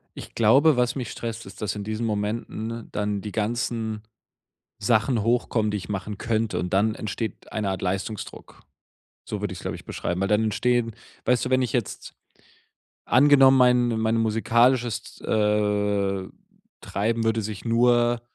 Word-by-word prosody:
Ich - - -10
glaube, 130 +6 +5
was 125 0 +1
mich 125 -4 -4
stresst, 115 0 -6
ist, 95 - -12
dass 105 -1 -2
in 105 - -5
diesen 110 +2 -3
Momenten 110 +2 -3
dann 105 -1 -2
die 105 0 -6
ganzen 110 0 -2 0.8
Sachen 110 +1 +2
hochkommen, 115 -2 +1
die 105 - -1
ich 100 - -7
machen 105 0 -4
könnte. 115 -1 -1
Und 90 -1 -3
dann 110 +2 +2
entsteht 110 0 -5
eine 105 -3 -1
Art 95 -2 -4
Leistungsdruck, 95 +3 -5 0.6
so 105 - -5
würde 105 -3 -3
ich 90 - -7
es, - - -11
glaube - - -4
ich, - - -14
beschreiben. 90 +1 -3
Weil 95 - 0
dann 105 +1 +2
entstehen 120 +1 +1 0.3
weißt 125 0 +2
du, 130 - -4
wenn 130 0 +3
ich 125 - -2
jetzt 120 -5 -3 0.9
angenommen, 135 +1 +6
mein 125 -1 +4
mein 110 0 +1
musikalisches, 115 +2 +1
äh, 105 -2 0 0.5
Treiben 115 +3 -1
würde 115 0 +1
sich 105 -1 -6
nur 120 0 +3
110 Hz, 160 wpm, -25 LUFS, 105-120 Hz, 0.9 s, angenommen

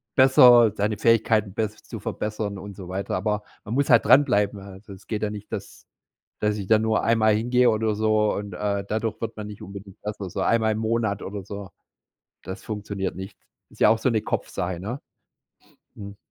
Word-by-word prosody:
besser 125 -4 +7
seine 105 +1 -1
Fähigkeiten 110 -3 +2
bess 110 0 -3
zu - - -8
verbessern 105 -1 -4
und 100 +1 -9
so 95 -3 -8
weiter. 95 +1 -3
Aber 105 +2 -1 0.2
man 110 - -5
muss 140 +1 +1
halt - - +5
dranbleiben. 105 -8 +4
Also, 100 +1 -11
es 95 - -15
geht 110 -2 -3
ja 105 - 0
nicht, 105 -1 -9
dass - - -7 0.5
dass 105 0 0
ich 100 -2 -5
da 110 0 +5
nur 110 0 +1
einmal 110 -2 +3
hingehe 125 +3 +3
oder 110 -1 0
so 110 0 +2
und 100 -1 -5
äh, 100 +1 -2
dadurch 110 +1 -2
wird 115 0 -4
man 105 -1 -6
nicht 105 -1 -10
unbedingt 100 0 -10
besser. 105 -2 -5
So - - -4
einmal 110 -1 +2
im - - -4
Monat 110 -2 -1
oder 100 0 -6
so, 100 0 -8 0.7
das 95 - -7
funktioniert 100 -3 -4
nicht. 95 +1 -8 0.3
Ist - - -18
ja - - +7
auch 110 - +4
so 130 - +1
'ne 110 -3 +1
Kopfsache, 90 -4 -3
ne? 115 +9 -5 0.9
Mhm. 100 -1 -9
105 Hz, 195 wpm, -24 LUFS, 100-110 Hz, 0.9 s, besser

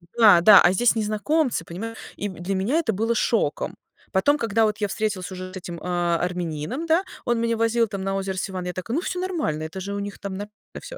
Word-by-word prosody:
Да-да, 210 -3 +8
а 175 - +5
здесь 235 +7 +3
незнакомцы, 220 - 0
понимаешь? 225 +7 -6 0.2
И 205 - -3
для 185 +1 -4
меня 205 +11 +1
это 245 -10 0
было 225 +4 0
шоком. - - 0 0.4
Потом, 285 +10 +3
когда 225 -3 +2
вот 215 0 -1
я 210 - 0
встретилась 205 -3 -2
уже 185 0 -7
с - - -6
этим, 175 -2 -7
а, 175 -1 0
армянином, 180 - -3
да, 330 +3 +3 0.2
он 240 -1 +1
меня 230 0 0
возил 230 +1 +2
там 200 -2 -5
на 195 0 -1
озеро 195 -1 -3
Севан. 185 -1 -3
Я 180 - -3
такая: 185 +7 -4
"Ну, 330 - +1
всё 360 - -3
нормально, 330 - -2
это 160 +4 -6
же 200 +2 -4
у 200 - -3
них 200 0 -5
там 200 - -5
нормально 205 +2 -6 0.3
всё, - - -9
205 Hz, 225 wpm, -24 LUFS, 185-230 Hz, 0.4 s, Да-да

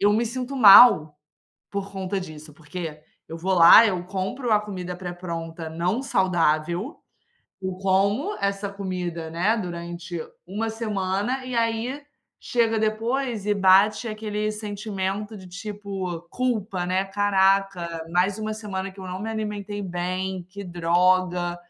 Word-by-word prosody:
eu 205 +1 +4
me 225 +3 +2
sinto 255 +3 -4
mal, 195 - +8 0.5
por 200 0 -4
conta 190 0 -3
disso, 155 -3 -10
porque 155 0 -7 0.3
eu 165 - -6
vou 190 +3 -1
lá, 175 +6 +9
eu 185 -5 -1
compro 195 +6 -3
a 210 - +5
comida 185 -4 -6
pré-pronta 170 -2 -6
não 175 +9 -1
saudável, 180 - 0 0.6
eu 190 -1 -3
como 200 - +1
essa 200 0 -1
comida, 180 -4 -4
né, 180 +8 +1
durante 170 -3 -5 0.3
1 215 +5 -3
semana, 215 +3 -2
e 255 -1 -5
aí 230 +4 -1 0.4
chega 230 -2 +1
depois 225 +1 -1
e 210 - +2
bate 200 +3 +4
aquele 215 -1 -3
sentimento 210 -1 -4
de 190 -2 -11
tipo, 195 -2 -6
culpa, 220 -7 -1
né, 185 +2 +1
"Caraca, 195 -3 +1
mais 180 +3 +2
uma 215 0 -3
semana 195 -3 -5
que 190 - -19
eu 190 - -7
não 185 +1 -5
me 220 +2 -4
alimentei 210 -2 -4
bem, 185 +1 -3
que 200 +1 -8
droga". 175 0 +1
195 Hz, 140 wpm, -24 LUFS, 180-215 Hz, 0.6 s, lá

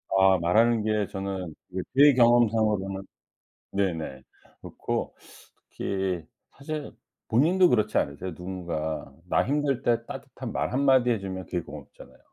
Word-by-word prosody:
아 95 0 +5
말하는 110 +7 +3
게 105 -2 0
저는 95 -3 -5 0.2
이게 95 - -3
제 145 +1 +7
경험상으로는 110 -5 +3 0.7
네네. 80 -9 -2 0.4
그렇고 - - -4 0.6
특히 95 -4 -2 0.3
사실 150 +1 -6 0.4
본인도 175 +10 +4
그렇지 110 -6 +1
않으세요? 75 +5 -3
누군가 80 -5 -4 0.2
나 - - +2
힘들 140 -2 0
때 115 -2 +1
따뜻한 - - -7
말 - - -2
한마디 130 -2 +4
해 115 - +2
주면 95 -1 -6
그게 90 - -2
고맙잖아요. - - -12
100 Hz, 285 characters per minute, -26 LUFS, 95-120 Hz, 0.7 s, 제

